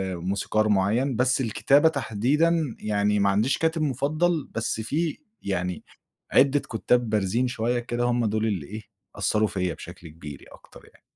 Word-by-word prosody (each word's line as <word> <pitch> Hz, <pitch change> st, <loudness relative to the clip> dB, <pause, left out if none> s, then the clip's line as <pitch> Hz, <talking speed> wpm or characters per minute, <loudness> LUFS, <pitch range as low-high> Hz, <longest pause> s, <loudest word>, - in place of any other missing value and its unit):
موسيقار 100 Hz, +4 st, -1 dB
مُعيّن، 110 Hz, +7 st, +1 dB
بس 130 Hz, +2 st, +2 dB
الكتابة 140 Hz, +7 st, +3 dB
تحديدًا 145 Hz, +4 st, 0 dB
يعني 105 Hz, 0 st, 0 dB
ما 100 Hz, 0 st, +3 dB
عنديش 105 Hz, +7 st, +2 dB
كاتب 160 Hz, 0 st, 0 dB
مُفضل، 155 Hz, +4 st, 0 dB
بس 110 Hz, -1 st, -1 dB
في 150 Hz, +7 st, -2 dB, 0.2 s
يعني 90 Hz, -2 st, -3 dB, 0.5 s
عدِة 140 Hz, +2 st, +4 dB
كُتّاب 120 Hz, -1 st, 0 dB
بارزين 110 Hz, +4 st, +1 dB
شوية 120 Hz, 0 st, -1 dB
كده، 120 Hz, 0 st, -3 dB
هُم 120 Hz, -1 st, +1 dB
دُول 110 Hz, +1 st, 0 dB
اللي 95 Hz, -9 st, -2 dB
إيه 110 Hz, +2 st, -7 dB, 0.3 s
أثّروا 110 Hz, 0 st, +1 dB
فيّا 90 Hz, -4 st, -2 dB
بشكل 85 Hz, -, -11 dB
كبير 75 Hz, -3 st, -10 dB
ي -, -, -15 dB
أكتر -, -, -16 dB
يعني. -, -, -25 dB
115 Hz, 155 wpm, -25 LUFS, 100-135 Hz, 0.5 s, عدِة